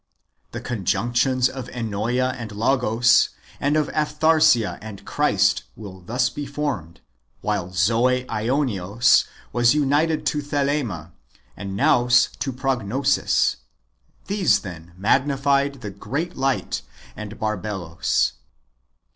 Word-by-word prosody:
The - - -6
conjunctions 120 +4 +1
of 130 -1 -7
Ennoea 120 +2 -1
and 115 -3 -7
Logos, 120 +1 +3 0.3
and 145 +2 +1
of 155 - +2
Aphtharsia 155 -5 +2
and 105 -2 -10
Christ, - - +2
will 95 -4 -10
thus 125 +7 0
be 145 +1 -6
formed; 140 - -4 0.4
while 100 -4 -2
Zoe 115 +8 +2
Aionios 115 -3 +2 0.3
was 120 +3 +4
united 150 +2 +1
to 150 - 0
Thelema, 140 - -2 0.4
and 100 -1 -6
Nous 120 +3 +4
to 135 - -2
Prognosis. 130 +1 +1 0.7
These, 195 -1 +2
then, 85 -3 -10
magnified 140 +5 +1
the 105 -3 -6
great 145 - -4
light 135 -1 -1 0.3
and 105 0 -8
Barbelos. 100 -5 -1
125 Hz, 105 wpm, -23 LUFS, 105-140 Hz, 0.7 s, was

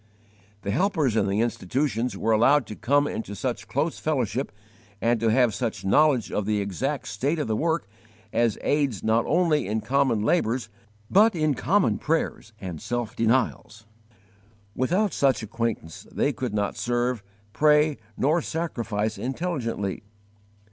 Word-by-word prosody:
The 100 - -2
helpers 155 - +1
in 100 -3 +2
the 100 +3 +1
institutions 120 0 -1
were 115 - 0
allowed 125 +5 +4
to 105 - -8
come 145 +6 +2
into 105 -6 -4
such 125 +3 -3
close 160 - -1
fellowship 130 -5 -1 0.5
and 115 0 +2
to 115 - +1
have 120 -1 +3
such 115 -3 -3
knowledge 135 +3 +3
of 105 -1 -2
the 105 -1 +1
exact 100 -4 -2
state 135 - -1
of 150 - -2
the 110 - 0
work 160 -2 0 0.5
as 115 -3 +2
aids 140 -9 0
not 110 +1 +2
only 160 - +2
in 110 +2 0
common 125 -1 +1
labours, 120 -3 +1 0.4
but 215 +1 +5
in 155 -2 +2
common 195 +9 +1
prayers 155 -7 -1
and 90 -5 -6
self 120 0 -3
denials. 115 -2 0 0.9
Without 185 +10 +1
such 135 -4 +2
acquaintance 110 -7 -4
they 145 - 0
could 120 -3 -4
not 100 -1 -1
serve, 120 -1 -1 0.3
pray, 150 0 +4 0.2
nor 155 +6 +2
sacrifice 115 -11 -2
intelligently. 125 - -3
120 Hz, 145 wpm, -25 LUFS, 110-150 Hz, 0.9 s, but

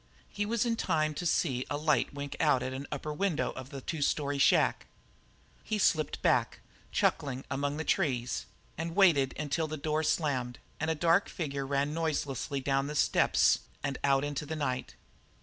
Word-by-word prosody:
He 205 0 -2
was 235 +2 +1
in 230 -1 0
time 155 -5 +1
to 175 +4 -2
see 130 -7 +1
a 145 - -1
light 150 -4 +1
wink 140 0 -6
out 145 -5 +3
at 130 +1 -3
an 135 +2 -6
upper 150 +1 -4
window 165 0 0
of 130 0 -8
the 140 -2 -7
two 160 +3 -4
story 145 0 0
shack. - - +3 0.8
He 215 - -1
slipped 155 -6 +1
back, - - +2 0.3
chuckling, 135 -2 0
among 140 +2 -1
the 160 - -2
trees, 130 -8 0 0.3
and 165 +1 -3
waited 160 -9 +4
until 155 +2 -1
the 155 0 -5
back 140 - -16
door 155 0 +1
slammed 130 -6 0 0.2
and 160 - -1
a 160 - +1
dark 170 +5 +3
figure 140 -6 -3
ran 140 +1 0
noiselessly 145 -4 -2
down 135 +1 0
the 150 - -5
steps - - +3 0.2
and 140 -1 -2
out 135 0 +3
into 145 0 -3
the 160 - -3
night. 130 -4 -3
145 Hz, 185 wpm, -30 LUFS, 135-160 Hz, 0.8 s, waited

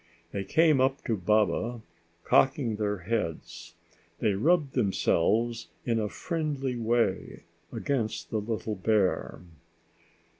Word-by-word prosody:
They 100 - -3
came 155 - +3
up 135 +1 +1
to 115 - 0
Baba, 110 +4 +1 0.4
cocking 130 -5 +2
their 105 -3 -2
heads. 100 -7 -4 0.4
They 105 +1 +1
rubbed 145 - +2
themselves 115 +1 +1 0.2
in 115 -2 +1
a 105 -1 -1
friendly 145 - -3
way 115 -4 -1 0.3
against 110 -11 -2
the 110 - 0
little 110 0 -3
bear. 100 -4 0
115 Hz, 110 wpm, -28 LUFS, 105-130 Hz, 0.4 s, came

